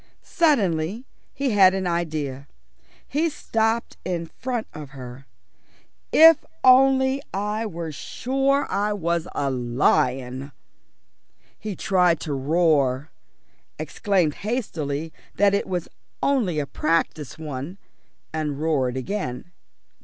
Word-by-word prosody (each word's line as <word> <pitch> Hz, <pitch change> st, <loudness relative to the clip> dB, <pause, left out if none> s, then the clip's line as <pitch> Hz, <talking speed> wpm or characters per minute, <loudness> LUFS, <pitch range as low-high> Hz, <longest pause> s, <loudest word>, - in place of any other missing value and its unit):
Suddenly 210 Hz, -, +1 dB, 0.3 s
he 275 Hz, -2 st, -1 dB
had 190 Hz, -2 st, +6 dB
an 190 Hz, -1 st, -2 dB
idea. 155 Hz, -6 st, -2 dB, 0.6 s
He 320 Hz, +4 st, +1 dB
stopped 225 Hz, -5 st, -1 dB
in 175 Hz, -2 st, -2 dB
front 240 Hz, +6 st, -4 dB
of 150 Hz, -3 st, -8 dB
her. 125 Hz, +1 st, -10 dB, 0.8 s
"If 325 Hz, -1 st, +8 dB, 0.2 s
only 265 Hz, +1 st, +5 dB
I 210 Hz, +3 st, -1 dB
were 170 Hz, -4 st, -5 dB
sure 270 Hz, -, 0 dB
I 210 Hz, +1 st, 0 dB
was 170 Hz, -3 st, -1 dB
a 140 Hz, -1 st, 0 dB
lion." 125 Hz, +2 st, 0 dB, 1.1 s
He 210 Hz, -2 st, -5 dB
tried 180 Hz, -4 st, +2 dB
to 150 Hz, -, -3 dB
roar, 140 Hz, -1 st, +1 dB, 0.7 s
exclaimed 185 Hz, -7 st, 0 dB
hastily 165 Hz, -, -3 dB, 0.2 s
that 200 Hz, 0 st, +4 dB
it 200 Hz, -, 0 dB
was 180 Hz, -3 st, -2 dB, 0.4 s
only 235 Hz, -, +1 dB
a 150 Hz, -, 0 dB
practice 155 Hz, -1 st, -1 dB
one, 150 Hz, +3 st, -6 dB, 0.6 s
and 150 Hz, -3 st, -2 dB
roared 135 Hz, -5 st, 0 dB
again. 130 Hz, -1 st, -4 dB
170 Hz, 110 wpm, -24 LUFS, 145-220 Hz, 1.1 s, If